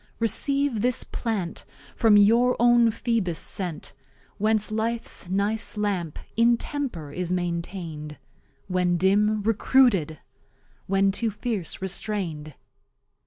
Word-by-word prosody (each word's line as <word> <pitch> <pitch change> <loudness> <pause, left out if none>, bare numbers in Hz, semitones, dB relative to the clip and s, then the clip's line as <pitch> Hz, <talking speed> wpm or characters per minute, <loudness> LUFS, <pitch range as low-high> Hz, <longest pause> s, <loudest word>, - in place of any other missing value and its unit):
Receive 275 +1 0
this 250 +1 +2
Plant, 205 -8 -4 0.3
from 220 -3 +5
your 235 +5 +4
own 240 -1 +5
Phoebus 220 -6 -1
sent; 180 -5 -4 0.5
Whence 215 0 +1
Life's 225 -4 -3
nice 205 +3 0
Lamp 190 -7 -2 0.2
in 235 +1 +4
Temper 235 - -4
is 180 +2 -3
maintain'd, 170 -3 -4 0.5
When 180 -2 +1
Dim, 205 +3 +2
Recruited, 215 - +2 0.7
when 195 0 +2
too 225 +3 -1
fierce, 210 -4 -4
restrained. 175 -6 -3
205 Hz, 105 wpm, -25 LUFS, 180-230 Hz, 0.7 s, from